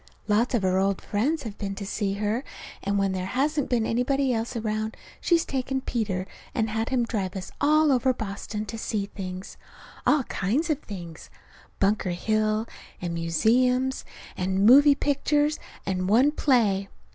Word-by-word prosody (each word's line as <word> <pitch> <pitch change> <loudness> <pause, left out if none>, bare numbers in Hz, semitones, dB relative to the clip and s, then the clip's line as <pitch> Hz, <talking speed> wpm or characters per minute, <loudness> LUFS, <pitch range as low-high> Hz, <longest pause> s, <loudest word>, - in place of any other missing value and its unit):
Lots 225 +4 +2
of 220 - 0
her 185 0 +2
old 195 0 +1
friends 280 +10 -1
have 220 -4 -7
been 195 -2 -3
to 200 - -6
see 195 0 -1
her; 210 +5 -1 0.4
and 200 +1 0
when 195 -1 +1
there 185 -1 -3
hasn't 275 +5 0
been 235 -3 +1
anybody 260 +3 +1
else 230 +2 -2
around 220 -1 -2 0.2
she's 340 -2 +3
taken 265 0 -2
Peter 210 -8 -2 0.3
and 220 -3 0
had 225 +1 -1
him 255 -2 +1
drive 200 -5 -2
us 185 -2 -6
all 305 +1 +4
over 260 0 +3
Boston 210 -1 -5
to 225 +1 -6
see 210 -2 -2
things; 185 -2 -7 0.5
all 295 -3 +4
kinds 250 - -1
of 295 - 0
things; 175 - -9 0.5
Bunker 195 -1 +2
Hill 215 +4 0 0.3
and 175 -2 -3
museums, 250 +10 +2 0.3
and 190 +2 0
moving 280 +5 +8
pictures, 295 +2 +1 0.3
and 185 -1 -1
one 250 +7 +5
play. 215 -10 +2
220 Hz, 160 wpm, -26 LUFS, 195-260 Hz, 0.5 s, moving